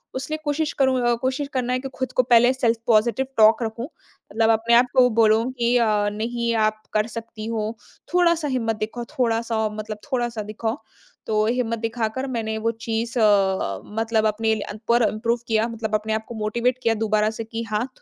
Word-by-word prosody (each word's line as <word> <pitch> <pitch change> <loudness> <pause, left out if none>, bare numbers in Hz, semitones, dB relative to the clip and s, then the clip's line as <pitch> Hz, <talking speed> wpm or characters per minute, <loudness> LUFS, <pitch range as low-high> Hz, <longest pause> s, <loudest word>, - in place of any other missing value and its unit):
इसलिए 290 +4 -3
कोशिश 295 +1 -1
करूँ 265 -1 +3
अ, 240 0 +2
कोशिश 260 +2 -1
करना 250 -1 -1
है 255 - 0
कि 270 +1 -6
खुद 260 0 -3
को 255 - +3
पहले 245 +1 +5
सेल्फ 235 -3 +1
पॉज़िटिव 235 +3 +2
टॉक 220 +2 +5
रखूँ। 230 +2 -4
मतलब 225 -6 -4
अपने 225 +1 +2
आप 240 +2 +6
को 250 -1 +7
बोलूँ 225 +3 +3
कि 245 -1 0
अ, 235 - +3 0.3
नहीं, 235 +2 -2
आप 215 -1 +1
कर 215 +1 +1
सकती 230 -1 -7
हो। 220 -1 -2 0.4
थोड़ा-सा 340 -3 +3
हिम्मत 235 -5 -1
दिखाओ, 220 +3 -4 0.2
थोड़ा-सा 230 -1 +1
औ - - 0
मतलब 215 0 -5
थोड़ा-सा 240 -3 -1
दिखाओ। 220 +3 -3 0.5
तो 215 -1 +2
हिम्मत 230 0 -1
दिखाकर 230 +3 -2
मैंने 220 -2 -2
वह 225 +1 0
चीज़ 230 +2 -2
अ, 195 - +2 0.2
मतलब 225 -1 +1
अपने 220 +1 +1
ल 215 - -5
अन 210 - -7
पर 235 0 +4
इम्प्रूव 230 +2 -1
किया। 220 0 +2
मतलब 220 -2 -3
अपने 215 +1 -1
आप 220 0 -2
को 235 - -6
मोटिवेट 235 +4 0
किया 230 - +3
दोबारा 215 0 +2
से - - -2
कि 225 +1 -5
हाँ, 215 +3 -1
230 Hz, 195 wpm, -23 LUFS, 220-245 Hz, 0.5 s, को